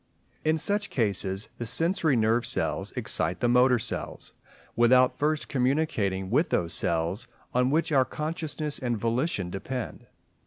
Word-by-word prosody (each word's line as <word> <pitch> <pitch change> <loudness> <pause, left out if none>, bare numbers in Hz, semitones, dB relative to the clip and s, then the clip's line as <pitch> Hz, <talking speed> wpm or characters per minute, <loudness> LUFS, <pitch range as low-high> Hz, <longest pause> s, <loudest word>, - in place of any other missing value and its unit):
In 155 +1 +2
such 205 +5 +1
cases 100 -3 -1
the 120 - -3
sensory 165 - +2
nerve 115 +1 +2
cells - - -2
excite - - -1
the 120 - +1
motor 125 +1 +5
cells, 115 +2 -5 0.4
without 125 +2 +5
first 155 +1 0
communicating 125 -9 0
with 150 +8 +2
those 85 -1 0
cells 85 +8 -1 0.3
on 125 +1 +2
which 160 +3 +1
our 135 -3 +5
consciousness 155 0 -4
and 120 -3 -1
volition 115 - -1
depend. 115 +6 -5
125 Hz, 140 wpm, -27 LUFS, 110-150 Hz, 0.4 s, motor